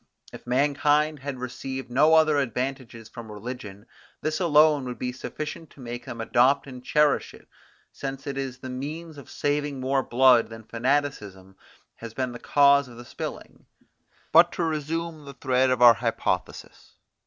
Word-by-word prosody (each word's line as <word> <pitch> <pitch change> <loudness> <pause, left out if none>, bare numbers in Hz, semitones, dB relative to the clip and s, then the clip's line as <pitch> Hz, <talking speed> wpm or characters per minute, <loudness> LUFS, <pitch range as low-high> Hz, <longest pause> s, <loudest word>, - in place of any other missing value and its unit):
If - - -12
mankind 145 +3 +2
had 135 0 -5
received 130 +1 -6
no 150 +6 +5
other 155 -2 +4
advantages 125 -2 -4
from 110 -1 -10
religion, 105 -2 -8 0.4
this 155 +2 -2
alone 150 -4 +4
would 125 -1 -5
be 125 - -3
sufficient 150 +4 -7
to - - -20
make 120 -1 -7
them 115 - -7
adopt 125 +5 +3
and 125 -2 -10
cherish 150 +2 +1
it, - - -19 0.4
since 135 0 -6
it 140 - -4
is 135 -2 -4
the 130 0 -9
means 150 +4 -6
of 140 - -14
saving 145 -1 -2
more 135 +1 +1
blood 125 -1 +4
than 115 0 -10
fanaticism 115 -6 -2 0.4
has 115 -1 -9
been 130 -1 -2
the 120 - -9
cause 140 -1 +4
of 120 0 -12
spilling. - - -8 0.6
But 170 +2 +6
to 175 - -2
resume 160 0 -3
the 140 -1 -10
thread 130 -1 +1
of 125 -1 +2
our 120 -1 +10
hypothesis. 115 0 -3
135 Hz, 160 wpm, -25 LUFS, 120-145 Hz, 0.6 s, our